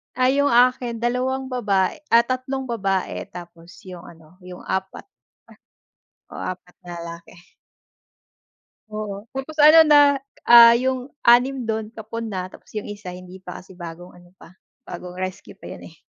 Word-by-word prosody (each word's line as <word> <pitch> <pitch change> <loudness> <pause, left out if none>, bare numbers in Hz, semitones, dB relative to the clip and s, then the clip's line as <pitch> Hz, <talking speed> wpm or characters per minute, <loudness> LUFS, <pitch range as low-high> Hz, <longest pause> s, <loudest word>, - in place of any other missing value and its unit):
Ay 255 +2 +2
yung 285 - +3
akin 240 -1 +2
2 260 +2 -1
baba 200 -7 +1 0.2
ah, 230 0 +5
3 255 +2 -3
babae 195 -4 -2
tapos 170 -1 -12
yung 180 -2 -11
ano, 165 +1 -17
yung 180 0 -10
4- 190 - -4 1.2
oo - - -9
4 180 -1 -11
na 175 - -9
lalaki. 170 0 -9 1.6
Oo, 210 -1 -6
tapos 270 +4 -7
ano 305 +2 +7
na 295 -1 +7 0.4
ah, 235 0 +9
yung 255 +1 -2 0.2
6 250 +2 +4
don 220 -1 -3
kapon 225 +1 -7
na 185 -2 -5
tapos - - -16
yung 210 - -3
1 205 -2 -9
hindi 185 +1 -12
pa 180 -1 -9
kasi 190 +1 -16
bagong 175 0 -10
ano 175 0 -18
pa, 175 - -17 0.3
bagong 180 0 -9
rescue 185 0 -7
pa - - -19
yun - - -11
eh. - - -18
215 Hz, 155 wpm, -22 LUFS, 180-250 Hz, 1.6 s, ah